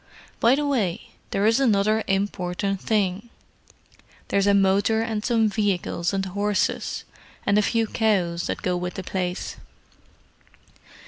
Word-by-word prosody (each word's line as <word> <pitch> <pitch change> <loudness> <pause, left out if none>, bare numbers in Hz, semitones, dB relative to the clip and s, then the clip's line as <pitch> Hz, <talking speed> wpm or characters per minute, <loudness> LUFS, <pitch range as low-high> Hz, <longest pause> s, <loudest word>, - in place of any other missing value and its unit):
By 235 +3 +5
the 295 +1 -1
way, 220 -12 -1 0.2
there 200 - 0
is 225 +3 +4
another 215 -3 +2
important 195 0 -1
thing: 205 0 0 1.0
there's 200 0 +2
a 200 - +5
motor 200 +3 +3
and 220 -2 -3
some 225 -2 +2
vehicles 195 -5 -1
and 195 -1 -1
horses, 200 +1 -1 0.4
and 200 - +3
a - - +4
few 225 +2 +1
cows, 190 -7 0
that - - -4
go 180 - 0
with 180 0 -4
the 190 - -5
place. 180 -1 -3
200 Hz, 135 wpm, -24 LUFS, 185-220 Hz, 1.0 s, By